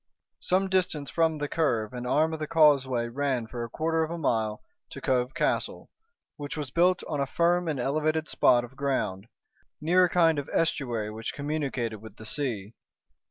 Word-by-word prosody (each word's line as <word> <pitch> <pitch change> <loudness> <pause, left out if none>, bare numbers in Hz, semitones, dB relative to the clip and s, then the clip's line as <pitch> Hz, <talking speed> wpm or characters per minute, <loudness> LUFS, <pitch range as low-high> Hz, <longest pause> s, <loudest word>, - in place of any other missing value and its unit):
Some 190 +2 +1
distance 180 -6 0
from 160 -1 +2
the 145 0 -2
curve 125 -9 0
an 125 0 -5
arm 155 +5 +2
of 160 - -4
the 155 - -3
causeway 135 -7 +4
ran 130 -1 -1
for 120 +1 -6
a 120 - -6
quarter 160 +5 0
of 160 - -1
a 170 - -4
mile 110 -8 -1 0.3
to - - -8
Cove 125 +1 0
Castle, - - -1 0.5
which 145 +1 -6
was 145 -4 -4
built 180 +3 +3
on 150 - -2
a 140 - 0
firm 175 +3 +2
and 150 -4 -1
elevated 155 +4 0
spot 120 -2 +4
of 120 +2 -11
ground, 130 -8 -2 0.5
near 180 +4 +4
a - - -1
kind 165 -4 +3
of 140 - -6
estuary 120 -9 0
which 110 +1 -5
communicated 140 -6 -2
with 110 0 -12
the 110 - -11
sea. 110 -5 -3
145 Hz, 185 wpm, -27 LUFS, 120-160 Hz, 0.5 s, causeway